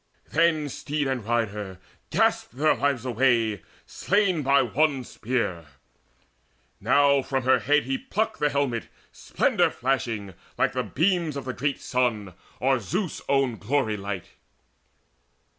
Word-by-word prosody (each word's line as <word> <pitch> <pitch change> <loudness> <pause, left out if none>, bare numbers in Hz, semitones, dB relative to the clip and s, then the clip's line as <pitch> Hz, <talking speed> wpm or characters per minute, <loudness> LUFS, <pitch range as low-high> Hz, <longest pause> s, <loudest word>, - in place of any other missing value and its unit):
Then 160 -2 +2
steed 145 +1 -3
and 130 -4 -2
rider 105 -4 -2 0.3
gasped 120 - +1
their 155 +2 +4
lives 140 -3 -1
away 115 -4 +1 0.2
Slain 195 -5 +1
by 140 0 +4
one 135 +2 +1
spear. 110 -10 -3 1.1
Now 140 +6 +4
from 135 0 -2
her 130 +1 +4
head 145 +1 +2
he 270 -1 -2
plucked 225 -4 -2
The 150 - +2
helmet 140 -5 -1 0.2
splendour - - +1
flashing 115 -7 -2 0.2
like - - +1
the - - 0
beams 165 -2 0
Of 135 - -6
the 130 - -3
great 140 +2 -2
sun, 115 -7 -1 0.3
or 130 0 +2
Zeus' 180 - -3
own 135 -4 +2
glory 115 -1 0
light. 100 -3 -5
130 Hz, 130 wpm, -25 LUFS, 115-145 Hz, 1.1 s, their